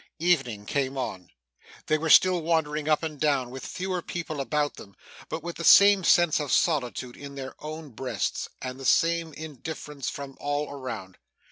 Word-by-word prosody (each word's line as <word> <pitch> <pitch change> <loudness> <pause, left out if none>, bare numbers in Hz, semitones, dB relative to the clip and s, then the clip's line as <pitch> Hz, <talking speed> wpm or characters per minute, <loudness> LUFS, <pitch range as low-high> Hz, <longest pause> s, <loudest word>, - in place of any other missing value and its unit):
Evening 135 -12 +1
came 135 +2 -1
on. 95 -8 -4 0.6
They 155 - +1
were 160 +1 -2
still 180 +1 +6
wandering 155 -2 0
up 155 +1 +2
and 155 -3 -4
down, 140 -5 +1
with 130 +1 -8
fewer 185 -1 -3
people 160 -4 -4
about 145 +1 0
them, 100 - -13 0.3
but 160 - -4
with 170 0 -6
the 170 - -5
same 200 +1 +7
sense 175 -2 +4
of 145 -3 -3
solitude 130 -7 0
in 140 -1 -9
their 130 -1 -6
own 155 0 -7
breasts, 130 +3 -3
and 130 0 -5
the - - -8
same 165 +2 +2
indifference 150 -2 -6
from 140 -1 -8
all 145 +1 -2
around. 125 -9 -7
150 Hz, 170 wpm, -27 LUFS, 135-165 Hz, 0.6 s, same